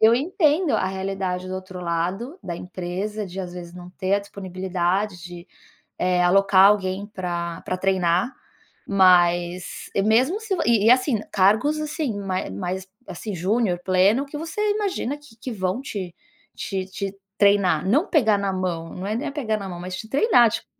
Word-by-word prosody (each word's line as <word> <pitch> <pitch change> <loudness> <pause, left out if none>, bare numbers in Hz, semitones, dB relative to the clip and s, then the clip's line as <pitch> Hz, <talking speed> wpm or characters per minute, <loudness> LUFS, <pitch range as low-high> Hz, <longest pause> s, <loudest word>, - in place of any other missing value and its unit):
eu 220 +1 +7
entendo 320 +1 +2
a - - +2
realidade 190 -1 -3
do 185 - -4
outro 185 -1 -7
lado, 180 - -2
da 170 -2 -5
empresa, 185 +4 -4
de 185 +1 -9
às 180 -1 -6
vezes 175 -1 -8
não 180 0 -10
ter 190 +1 -1
a - - +3
disponibilidade 185 -1 -2
de, 175 0 -9 0.5
eh, 180 0 +2
alocar 195 +1 +6
alguém 200 -1 +1
para 175 -4 -4
para 185 - -2
treinar, 185 +3 +1 0.6
mas 180 -2 +3
e 195 - +3
mesmo 255 - +3
se 420 -4 -1
vo - - -2
e 225 -3 +3
e - - +8
assim, 255 -3 +3
cargos 220 +11 +3
assim, 300 -6 -2
mai 190 - -3
mais, 185 - -4 0.2
assim, 210 -3 -6
júnior, 185 +1 0
pleno, 195 +8 +3
que 290 +1 -7
você 330 +7 -4
imagina 390 - -2
que 290 -6 -18
que 255 - -6
vão 190 +3 -2
te 190 -9 -5 0.4
te 190 -2 -3
te 195 0 -5 0.2
treinar, 195 -5 +3
não 290 - +3
pegar 220 - +4
na 200 -1 -1
mão, 175 -3 -3
não 185 +2 -5
é 215 - -1
nem 270 +3 -3
pegar 240 -7 -1
na 195 -2 -6
mão, 175 -1 -7
mas 185 +1 -5
te 220 - -8
treinar, 270 - +5
tip - - -4
195 Hz, 180 wpm, -23 LUFS, 180-230 Hz, 0.6 s, e